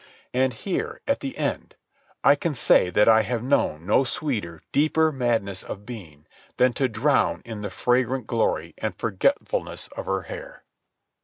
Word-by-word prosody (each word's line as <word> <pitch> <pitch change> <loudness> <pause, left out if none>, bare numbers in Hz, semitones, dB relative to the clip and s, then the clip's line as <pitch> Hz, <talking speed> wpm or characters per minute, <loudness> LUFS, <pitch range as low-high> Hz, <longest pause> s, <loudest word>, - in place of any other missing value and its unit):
And 130 +1 +2
here, 110 - -3
at - - +1
the - - -6
end, - - -3 0.5
I 140 - +7
can 150 +1 -2
say 90 - +4
that 105 +4 +3
I 110 0 +7
have 120 +1 -2
known 85 - +1
no 105 +7 +4
sweeter, 115 - -3
deeper 155 +2 +3
madness 115 -8 -1
of 105 0 -8
being 85 -12 -10 0.3
than 125 -1 +4
to 135 0 +1
drown 110 - +1
in 110 -3 -6
the 100 - -4
fragrant 125 +2 0
glory 85 -9 0
and 105 -5 -3
forgetfulness 195 - -1
of - - -7
her - - -1
hair. - - -9
120 Hz, 160 wpm, -25 LUFS, 100-135 Hz, 0.5 s, I